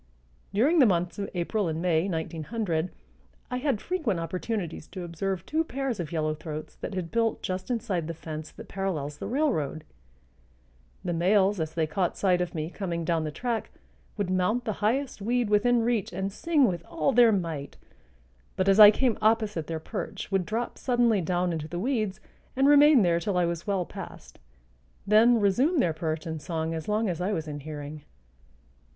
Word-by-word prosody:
During 280 - +3
the 260 - +7
months 180 0 0
of 200 - -3
April 185 +3 0
and 160 0 -2
May, 170 +1 +1
1900, 165 +1 -2 0.6
I 250 - -1
had 265 -4 0
frequent 295 - -1
opportunities 175 0 -4
to 185 0 -7
observe 175 +2 -3
two 315 +1 0
pairs 270 -7 -3
of 170 -2 -4
yellow 155 -2 0
throats 155 0 -7
that 195 - -6
had 175 -3 -4
built 230 -1 0
just 185 +2 -3
inside 205 -9 -1
the 165 - -4
fence 155 -1 -7
that - - -12
parallels 155 -7 -3
the - - -4
railroad; 195 - 0 1.2
the 175 - 0
males, 190 +3 +3
as 160 -1 -3
they 160 -1 +2
caught 175 +2 -1
sight 180 -2 +2
of 180 -1 -3
me 155 -1 -2
coming 170 -5 -3
down 165 -1 0
the - - -2
track, 235 - -3 0.5
would 200 -3 -1
mount 215 +7 +1
the 215 - -1
highest 250 +2 0
weed 235 +1 0
within 235 +3 +3
reach 230 -4 0
and 190 +2 -3
sing 300 +5 +2
with 175 -4 -3
all 325 -4 0
their 240 -2 +6
might, 165 -8 -3 0.8
but 185 - 0
as 195 +1 +5
I 210 -1 +12
came 230 +1 +1
opposite 215 -6 +1
their 165 -1 -3
perch 160 - -6
would 190 -3 +1
drop 230 +3 -3
suddenly 240 -5 +2
down 175 +1 0
into 155 -2 -4
the 175 - -5
weeds 215 -2 -1 0.4
and 270 +1 +3
remain 290 -4 +7
there 170 -1 +3
till 185 +2 -1
I 175 - +3
was 170 +1 -3
well 195 -3 0
past, - - -10 0.7
then 225 +3 +5
resume 250 - +2
their 170 -10 +2
perch 155 +1 -3
and 160 -2 -4
song 160 -1 -3
as 160 -1 -5
long 215 +1 +1
as 175 -2 -2
I 190 +3 0
was 160 -4 -3
in 145 -1 -5
hearing. 150 0 -7
190 Hz, 185 wpm, -27 LUFS, 165-225 Hz, 1.2 s, I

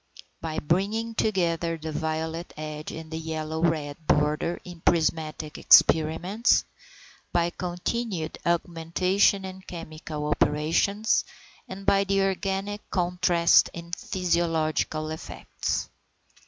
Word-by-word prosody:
By 160 -1 -4
bringing 205 +8 0
together 170 -6 0
the 160 0 -5
violet 160 +2 -3
edge 155 0 -6
and 160 0 -8
yellow 160 0 -3
red 155 -4 0
border 150 +3 +1
in 175 -2 -10
prismatic 155 -2 0
experiments, 175 +8 +4 0.7
by 175 0 +1
continued 180 0 -3
augmentation 175 +3 +1
in 190 0 -8
chemical 155 -4 -7
operations, 160 +9 +2 0.5
and 195 +1 -8
by 200 0 +4
the 195 0 +2
organic 195 +2 -2
contrast 175 -1 +3
in 170 0 -8
physiological 165 -4 0
effects. 160 - -4
170 Hz, 100 wpm, -26 LUFS, 160-190 Hz, 0.7 s, experiments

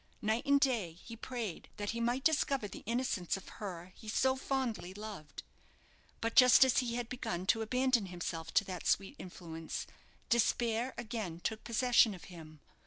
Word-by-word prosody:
Night 220 +4 0
and 280 0 +5
day 235 - +1
he 230 +7 -11
prayed 230 -6 -5
that 205 0 -2
he 235 +1 -3
might 240 +3 0
discover 280 -7 +2
the 195 - -9
innocence 230 -7 0
of 195 - -12
her 185 -3 -6
he 220 - -13
so 260 +4 +2
fondly 255 -9 -2
loved. 205 -8 -8 0.8
But 230 0 -1
just 255 +1 +9
as 260 - +3
he 240 -2 -1
had 240 -1 -2
begun 185 -8 -3
to 225 +3 +3
abandon 250 -1 +2
himself 165 -2 -5
to - - +6
that 185 -2 -5
sweet 195 +8 +1
influence, 165 -3 -6 0.4
despair 235 +1 +1
again 220 -8 -4
took 220 +5 -3
possession 235 -2 +4
of 175 - -13
him. 155 -3 -12
220 Hz, 170 wpm, -34 LUFS, 185-245 Hz, 0.8 s, just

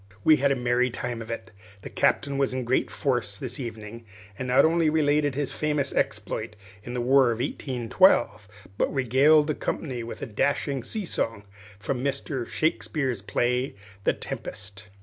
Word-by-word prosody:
We 155 - +6
had 140 +1 +2
a - - +3
merry 125 0 +1
time 120 -1 -4
of 115 - -8
it. 115 - -6 0.3
The - - -7
Captain 140 -1 +1
was 135 -2 +1
in 130 - -2
great 125 +2 +1
force 120 -7 -1
this 125 +2 -5
evening, 115 -2 -7 0.3
and 130 - -5
not 125 +4 +5
only 165 0 +3
related 145 -2 +2
his 145 -1 -2
famous 150 -2 -1
exploit 105 - -2 0.3
in 120 +2 -6
the 125 - -1
War 135 +2 +5
of 115 - -1
1812, 125 - +2 0.3
but - - +2
regaled 140 +4 +4
the 155 - 0
company 130 -4 -3
with 115 - -7
a - - -1
dashing 140 +4 0
sea 210 - -4
song 115 -10 -1 0.3
from 125 +5 -3
Mr. 140 -2 -2
Shakespeare's 140 -7 -1
play 125 +5 0
of - - -14 0.3
The - - +4
Tempest. 100 0 -6
130 Hz, 170 wpm, -26 LUFS, 120-145 Hz, 0.3 s, We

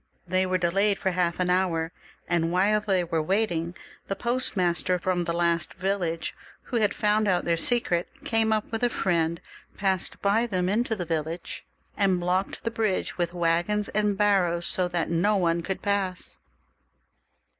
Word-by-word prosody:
They 185 +1 +1
were 185 0 +1
delayed 195 +4 +2
for 190 - -1
half 175 -1 0
an 180 0 +2
hour, 170 -3 +1 0.4
and 170 -1 +1
while 200 +4 +3
they 195 -4 +1
were 165 -2 -1
waiting 175 -2 0 0.3
the 195 - -2
postmaster 185 -8 0
fix)m 180 0 -1
the - - +1
last 170 0 0
village, 180 -3 -2 0.3
who 245 - -2
had 210 -3 +1
found 210 0 +2
out 180 -2 +1
their 170 - +2
secret, 175 -2 +1 0.2
came 225 -1 +2
up 215 +1 0
with 225 - -2
a 245 - +3
friend, 170 -5 0 0.4
passed 190 -3 -1
by 215 +4 +2
them 185 -4 0
into 225 +2 +1
the 180 -4 -4
village, 165 +1 -4 0.3
and 195 -3 +2
blocked 180 +2 -1
the 230 - -1
bridge 220 -5 -1
with 175 0 -1
waggons 175 +5 +1
and 210 -1 0
barrows, 185 -4 +2
so 180 -1 0
that 175 -2 -1
no 200 +5 +2
one 170 -2 +1
could 190 +2 -4
pass. 195 -3 -2
185 Hz, 165 wpm, -26 LUFS, 170-205 Hz, 0.4 s, while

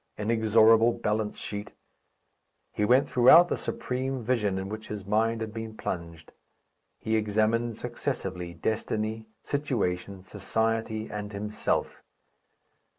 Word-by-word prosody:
Inexorable 110 +1 +4
balance 105 -1 -2
sheet! 105 0 -6 1.0
He 105 - -2
went 125 +5 +4
throughout 160 +8 +7
the - - +1
supreme 130 0 -3
vision 105 -5 0
in 95 0 -3
which 110 +2 -7
his 105 -2 -6
mind 110 +2 +1
had 110 -1 -4
been 110 -1 -6
plunged. 85 -2 -6 0.7
He 110 - -1
examined 110 +2 +1
successively 95 -8 -4
destiny, 110 0 -2 0.2
situation, 100 -9 -2
society, 110 +2 -1
and 105 0 -5
himself. 105 +1 -2
110 Hz, 110 wpm, -28 LUFS, 105-115 Hz, 1.0 s, throughout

